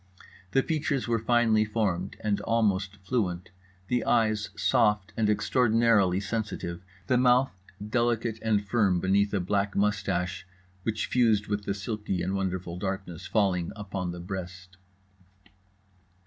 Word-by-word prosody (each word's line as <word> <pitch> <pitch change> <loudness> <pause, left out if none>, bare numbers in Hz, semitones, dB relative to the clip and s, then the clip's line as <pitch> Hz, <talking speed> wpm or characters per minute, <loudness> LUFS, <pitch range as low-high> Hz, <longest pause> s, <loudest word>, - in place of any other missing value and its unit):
The 135 - +4
features 145 -5 -1
were 115 -1 +1
finely 115 -1 +3
formed 105 -4 -1
and 105 -2 0
almost 105 -4 +1
fluent, 95 -5 -2 0.4
the 125 +2 0
eyes 110 -3 +1
soft 105 -5 +2
and 110 -2 +1
extraordinarily 110 -3 +3
sensitive, 100 -4 -4 0.2
the 125 +3 +2
mouth 125 +1 +4 0.4
delicate 115 -1 0
and 105 -2 +1
firm 100 -4 +2
beneath 100 +3 +2
a 100 - 0
black 100 +2 -1
moustache 95 -2 -1 0.3
which 110 +3 -1
fused 110 -4 +2
with 105 -1 -3
the 100 - -1
silky 105 -3 -3
and 95 - -1
wonderful 95 -3 -3
darkness 95 -2 -4
falling 95 -5 +1
upon 95 -4 -4
the 85 - -7
breast. 90 0 -7
105 Hz, 130 wpm, -28 LUFS, 95-115 Hz, 0.4 s, The